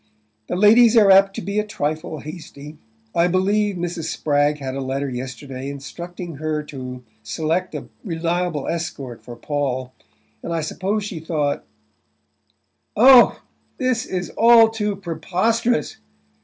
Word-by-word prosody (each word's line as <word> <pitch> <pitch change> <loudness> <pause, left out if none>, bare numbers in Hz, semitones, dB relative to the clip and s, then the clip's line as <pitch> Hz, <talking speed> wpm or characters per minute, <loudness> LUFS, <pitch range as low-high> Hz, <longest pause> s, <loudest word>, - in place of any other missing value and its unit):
"The - - -2
ladies 225 +4 +6
are 205 -3 +7
apt 195 +1 +5
to - - -5
be 200 +1 -1
a - - +1
trifle 155 -6 -4
hasty. 150 -2 -10 0.3
I 170 +1 +3
believe 200 +3 +1
Mrs. 175 -2 -4
Spragg 145 -2 +1
had 135 -2 -5
a 135 - -4
letter 135 +1 -2
yesterday 130 +1 -6
instructing 170 +4 -8
her 155 0 -2
to 130 -3 -8 0.2
select 160 +10 -2
a - - -6 0.2
reliable 170 - -2
escort 140 -8 -4
for 120 +2 -10
Paul; 130 -1 -3 0.5
and - - -6
I 165 - -1
suppose 195 +7 -2
she 195 -5 -5
thought 155 -3 -2 0.7
" - - -48
"Oh, 245 +2 +7 0.3
this 255 -2 0
is 180 -1 -4
all 230 -1 +6
too 210 -2 -2
preposterous!" 195 +7 -1
165 Hz, 140 wpm, -21 LUFS, 145-200 Hz, 0.7 s, are